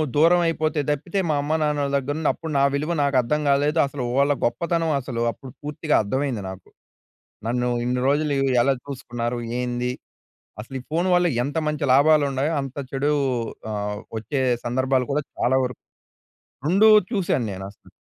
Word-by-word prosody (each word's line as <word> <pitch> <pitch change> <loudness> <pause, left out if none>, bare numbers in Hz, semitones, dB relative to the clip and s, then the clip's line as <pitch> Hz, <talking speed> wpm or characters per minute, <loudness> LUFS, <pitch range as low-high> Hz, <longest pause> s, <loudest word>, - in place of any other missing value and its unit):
దూరం 170 +4 +5
అయిపోతే 155 -1 0
తప్పితే, 160 +7 -1
మా 150 - +2
అమ్మానాన్నల 150 -1 0
దగ్గర 140 +1 -1
నుండి 160 -2 +1
అప్పుడు 160 -1 -7
నా 140 - +4
విలువ 150 +4 -1
నాకు 140 -1 0
అర్థం 150 +5 -1
కాలేదు. 145 +3 +2
అసలు 140 -2 -5
వాళ్ళ 140 +1 +4
గొప్పతనం 165 +7 0
అసలు, 125 -2 -4
అప్పుడు 130 +2 -12
పూర్తిగా 150 +1 -1
అర్థమైంది 125 0 -2
నాకు. 95 -1 -10 0.8
నన్ను 125 +1 0 0.2
ఇన్ని 125 +1 0
రోజులు 145 +1 +1 0.3
ఎలా 135 +1 +3
చూసుకున్నారు? 120 -3 -4 0.2
ఏంది. 125 0 -2 0.7
అసలు 115 +5 -8
ఈ - - -9
ఫోన్ 170 +4 +1
వల్ల 175 0 +3 0.2
ఎంత 145 +4 -3
మంచి 150 -1 -2
లాభాలు 150 +2 +5
ఉన్నాయో. 135 +4 0
అంత 135 -1 -7 0.2
చెడు 140 +2 0 0.6
ఆహ్, 105 0 -3 0.2
వచ్చే 130 +5 -2 0.2
సందర్భాలు 130 +1 +1
కూడా 150 +1 0
చాలా 130 +2 +2
వరకు 125 - -7 0.9
రెండు 195 +7 +5 0.2
చూసాను 175 - 0
నేను 95 0 -7
అసలు. 100 - -21
140 Hz, 155 wpm, -23 LUFS, 125-155 Hz, 0.9 s, దూరం